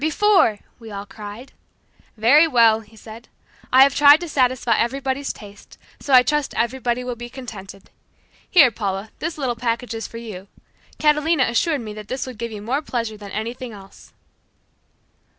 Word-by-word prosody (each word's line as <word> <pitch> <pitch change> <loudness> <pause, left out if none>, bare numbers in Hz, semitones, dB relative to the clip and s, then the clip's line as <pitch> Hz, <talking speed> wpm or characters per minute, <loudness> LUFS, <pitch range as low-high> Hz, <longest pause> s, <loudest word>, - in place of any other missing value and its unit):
Before!" 320 - +3 0.2
we 225 -2 -11
all 200 -1 -7
cried. 210 +5 -10 0.7
"Very 280 +9 +5
well," 230 -6 +4
he 220 0 -18
said, 225 +2 -12 0.4
"I 260 +1 +8
have 275 - +3
tried 290 +1 +7
to 345 - -5
satisfy 255 -4 +1
everybody's 270 +3 -1
taste, 205 -1 -14 0.2
so 280 - -6
I 255 -1 +8
trust 295 +1 -1
everybody 245 +1 -1
will 250 -1 -4
be 240 +1 -9
contented. 205 -7 -10 0.6
Here, 295 -9 +6
Paula, 200 -1 -4
this 320 +1 -4
little 260 -5 -2
package 235 0 -3
is 225 0 -5
for 230 - -10
you. 205 -5 -9 0.5
Catalina 300 0 +2
assured 275 +5 0
me 215 -2 -7
that 210 -1 -10
this 260 +2 -4
would 255 -4 -10
give 235 -1 -4
you 210 -1 -8
more 260 +7 -1
pleasure 230 -6 -4
than 205 -1 -10
anything 230 +4 -5
else." 195 -1 -15
240 Hz, 170 wpm, -21 LUFS, 220-275 Hz, 0.7 s, I